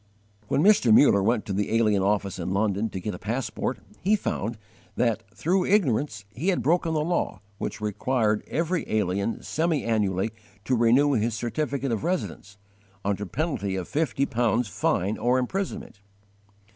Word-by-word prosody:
When 140 - +1
Mr. 200 - +5
Muller 110 -3 +6
went 110 +2 +1
to 100 - -3
the 105 +3 0
alien 105 -4 +3
office 100 -1 0
in 90 +2 -2
London 105 +1 +1
to 95 - -5
get 105 +3 -4
a - - -7
passport, 125 +2 -2 0.2
he 205 +4 +3
found 115 - -3 0.4
that, 115 -3 +1
through 175 - 0
ignorance, 135 - +1
he 155 +10 -4
had 190 - +2
broken 165 0 +2
the 150 - +1
law 175 +1 -1 0.2
which - - -4
required 105 +1 0
every 170 +2 -1
alien 100 +1 0
semi 160 -3 0
annually 105 -2 0 0.3
to 130 - +2
renew 125 +5 +4
his 115 -1 0
certificate 135 +3 -2
of 115 - -2
residence, 160 - -3 0.5
under 100 0 -1
penalty 100 - -2
of 95 -2 -4
fifty 145 -2 0
pounds 120 -2 +1
fine 100 +1 0
or 125 +2 +2
imprisonment. 130 - -3
115 Hz, 160 wpm, -26 LUFS, 105-145 Hz, 0.5 s, Muller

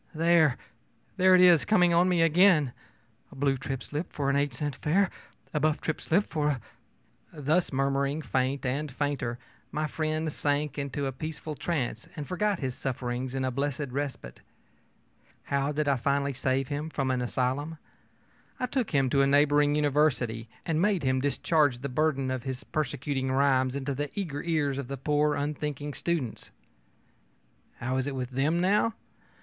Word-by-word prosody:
There 160 -4 +4 0.6
there 185 0 +6
it 180 - +6
is 175 -3 +7
coming 180 -5 +4
on 175 +2 +4
me 175 -2 +3
again: 165 -5 +4 0.6
a - - -12
blue 135 0 +1
trip 135 0 -4
slip 150 +4 -5
for 140 -1 0
an - - 0
eight 140 0 +1
cent 145 +3 -3
fare, 190 +5 +2 0.4
a 150 - +1
buff 155 +1 +1
trip 160 - -3
slip 195 +6 +2
for 150 -2 +1
a 145 - +1
ö - - -9 0.8
Thus 155 +6 +1
murmuring 140 +2 0
faint 130 +1 -1
and 140 +3 -2
fainter, 140 -3 -2 0.3
my 155 +1 -1
friend 155 0 -2
sank 145 0 -1
into 140 0 -3
a 135 - -1
peaceful 155 +3 -6
trance 135 -8 -3
and 145 -2 -5
forgot 205 +2 0
his 130 -5 -3
sufferings 125 0 -3
in 130 -1 -1
a 130 - 0
blessed 140 +1 -2
respite. 135 - -4 1.0
How 140 +1 0
did 150 0 -1
I 140 -2 +3
finally 140 +3 0
save 130 +1 0
him 145 +2 -3
from 135 -4 -1
an 125 -1 0
asylum? 130 +6 -1 0.8
I 250 - 0
took 250 -3 -1
him 135 -4 +2
to 140 - +4
a 135 - +4
neighboring 145 +1 +4
university 135 -6 +1 0.2
and 165 -2 0
made 200 -5 +2
him 130 -1 +1
discharge 145 -1 +2
the 140 +3 -5
burden 135 -1 0
of 130 -1 -2
his 130 0 -5
persecuting 135 -2 -2
rhymes 130 -1 +2
into 140 0 -2
the 145 +2 -3
eager 150 -7 -3
ears 150 -5 0
of 140 - -5
the 140 +1 -5
poor, 150 +2 +1
unthinking 145 0 -3
students. 155 -10 -3 1.3
How 130 +2 -2
is 130 +1 -1
it 140 - -3
with 125 -1 -4
them, 145 +6 +1
now? 210 +5 +2
145 Hz, 175 wpm, -28 LUFS, 130-155 Hz, 1.3 s, is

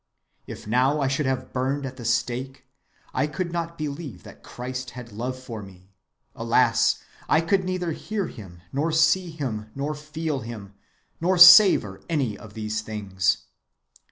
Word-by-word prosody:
If - - -9
now 130 +7 +2
I 135 - +1
should 140 +1 0
have 130 -1 -3
burned 135 +2 -1
at 130 -1 -7
the 120 - -8
stake, 130 +3 -2 0.5
I - - +1
could 170 +3 -4
not 170 0 -4
believe 145 - -6
that - - -13
Christ 125 0 -6
had 120 -2 -9
love 125 +5 -4
for 120 -4 -8
me; 95 -1 -15 0.4
alas, 115 +1 +2 0.3
I - - +5
could 185 +4 +1
neither 180 -2 -2
hear 205 +4 -3
him, 90 - -11
nor 150 +4 0
see 160 +3 +3
him, 120 -9 -5
nor 140 +2 -2
feel 150 0 -4
him, 110 -4 -8 0.5
nor 185 +2 +2
savor 175 - +8
any 135 -10 0
of 105 -1 -13
his 110 0 -3
things. 100 -3 -1
130 Hz, 155 wpm, -25 LUFS, 110-160 Hz, 0.5 s, savor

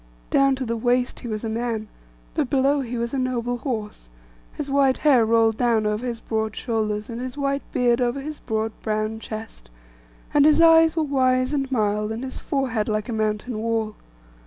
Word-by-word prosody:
Down 275 -1 +4
to 260 0 -4
the 230 0 -2
waist 245 +2 0
he 245 - -7
was 215 -1 -4
a - - -2
man, 225 -1 -2 0.5
but - - -1
below 275 +1 +2
he 245 -2 -4
was 235 +2 -3
a 270 - 0
noble 245 -1 -1
horse; 215 - -5 0.4
his 295 - -5
white 275 -1 +3
hair 270 -6 +4
rolled 225 0 +3
down 230 -3 +2
over 210 +2 -1
his 235 -2 -3
broad 220 -1 -2
shoulders, 215 -3 -2
and 235 0 -6
his 255 +1 -6
white 275 0 0
beard 240 0 +2
over 245 +3 0
his 300 +2 -6
broad 220 0 -2
brown 215 0 -2
chest; 215 - -8 0.6
and 290 - +5
his 305 +1 +5
eyes 325 -1 +6
were 320 - +3
wise 255 -2 +1
and 270 -2 -1
mild, 210 -3 0
and 225 +3 -4
his 260 - -6
forehead 250 -6 -1
like 215 +1 -1
a - - -2
mountain 215 +1 -2
wall. 225 -1 -1
240 Hz, 195 wpm, -23 LUFS, 220-265 Hz, 0.6 s, eyes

